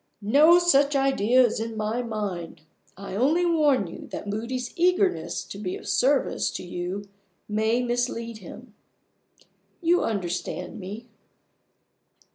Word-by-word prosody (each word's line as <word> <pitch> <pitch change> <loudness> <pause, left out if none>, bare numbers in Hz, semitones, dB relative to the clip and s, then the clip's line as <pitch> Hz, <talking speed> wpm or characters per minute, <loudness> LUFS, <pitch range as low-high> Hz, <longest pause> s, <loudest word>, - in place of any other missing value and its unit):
"No 315 +5 +8
such 290 -5 +3
idea 255 -2 +4
is 225 - -1
in 225 0 -4
my 215 +3 -1
mind. 205 -9 -5 0.4
I 195 -1 -8
only 300 - +2
warn 300 - +3
you 170 - -9
that - - -7
Moody's 235 +5 -4
eagerness 365 +2 +1
to 200 - -9
be 185 -3 -3
of - - -10
service 270 +2 +2
to - - -5
you 180 +3 -5 0.4
may 220 +3 +1
mislead 240 -2 -2
him. 220 +5 -12 1.1
You 350 0 +2
understand 190 +1 -3
me." 205 +5 -7
235 Hz, 125 wpm, -25 LUFS, 205-280 Hz, 1.1 s, No